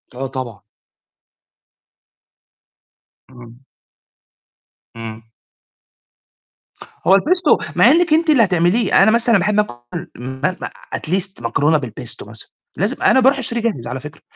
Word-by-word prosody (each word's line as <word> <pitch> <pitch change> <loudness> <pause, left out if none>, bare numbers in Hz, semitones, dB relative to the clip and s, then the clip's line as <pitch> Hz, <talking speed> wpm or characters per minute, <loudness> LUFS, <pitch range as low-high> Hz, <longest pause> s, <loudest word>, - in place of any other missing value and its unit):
آه، 135 +1 -4
طبعًا. 125 -6 -6 2.7
إمم. 120 -2 -14 1.4
إمم. 115 0 -9 1.8
هو 195 +1 +7
الpesto 355 - +1
مع - - +6
إنِّك 340 0 +3
أنتِ 325 +1 +2
اللي 275 -7 +5
هتعمليه، 185 +3 +3
أنا 220 - +5
مثلًا 235 -1 +3
باحب 210 +3 +1
آكُل 160 0 -5
ما 130 +8 -3
مع - - -4 0.3
at - - -7
least 190 -3 -2
مكرونة 145 +6 +1
بالpesto 125 -6 -7
مثلًا، - - -10 0.3
لازم 210 +9 -2
أنا 260 - +5
باروح 270 +2 +4
أشتريه 235 -2 -3
جاهز 210 - -2
على 125 +2 -4
فكرة، 150 +2 -11
180 Hz, 120 wpm, -18 LUFS, -, 2.7 s, هو